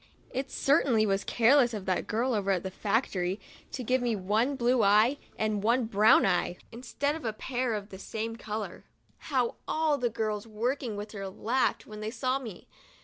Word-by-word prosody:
It 265 +1 -3
certainly 270 -6 +3
was 195 -1 0
careless 240 0 +4
of 200 -3 -6
that 185 -1 -1
girl 245 +4 0
over 200 -3 -1
at 190 -3 +1
the 190 - -4
factory 195 -3 -1 0.3
to 255 - -4
give 255 +2 +1
me 240 -2 0
one 215 +8 +1
blue 250 -1 +2
eye 215 +7 +4 0.2
and 215 -2 0
one 235 +3 +2
brown 215 0 +5
eye 180 -1 +1
instead 260 +4 -2
of 320 - -8
a 220 -2 -2
pair 245 0 -2
of 205 0 -6
the 190 - -10
same 225 +2 -4
color. 215 -4 -5 0.5
How 255 -5 0
all 310 -2 +1
the 240 - +1
girls 215 -1 -3
working 235 +2 -2
with 205 +1 -6
her 195 -2 -5
laughed 235 +7 0
when 215 -1 -9
they 215 0 -3
saw 255 +3 -1
me! 225 -9 -9
225 Hz, 190 wpm, -29 LUFS, 205-255 Hz, 0.5 s, brown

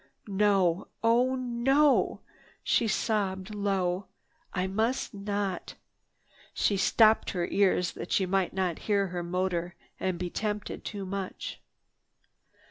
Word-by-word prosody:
"No, 195 -3 +2 0.2
oh 245 +3 +3
no!" 260 +4 +2 0.4
she 230 - +2
sobbed 200 -2 -1
low. 195 -2 -1 0.4
"I 180 0 -1
must 220 +7 -1
not!" 200 -2 -3 0.8
She 205 - +2
stopped 215 +3 +4
her 175 -2 0
ears 185 -3 +2
that - - -8
she 190 - +3
might 190 0 +1
not 185 -3 -1
hear 200 -2 +2
her 175 0 -3
motor 175 0 -2 0.2
and 185 -2 -1
be 175 0 -4
tempted 210 -2 -3
too 200 -2 -5
much. 195 0 -5
195 Hz, 120 wpm, -29 LUFS, 185-215 Hz, 0.8 s, stopped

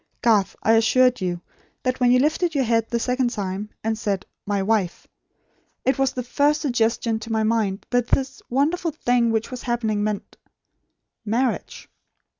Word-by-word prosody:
Garth, 210 -4 +3
I 225 - +4
assure 250 +3 +5
you, 175 -2 -2 0.4
that 255 0 -1
when 245 -1 +4
you 250 - +6
lifted 315 +5 +1
your 275 - +3
head 230 -1 +1
the 235 - 0
second 250 +1 +1
time, 205 -2 -4
and 220 0 0
said, 200 -3 -2 0.2
'My 200 -1 0
wife,' 200 -4 0 0.8
it 265 +1 +2
was 270 -1 +2
the 250 - -3
first 290 +5 +1
suggestion 230 -4 0
to 225 +1 -8
my 220 -1 +1
mind 215 -3 0
that 245 -1 +2
this 270 +1 -1
wonderful 310 +7 +1
thing 245 -6 +1
which 220 +3 -1
was 255 - -6
happening 225 -4 -1
meant 210 -1 -4 0.9
marriage. 235 +3 -2
230 Hz, 165 wpm, -23 LUFS, 215-255 Hz, 0.9 s, you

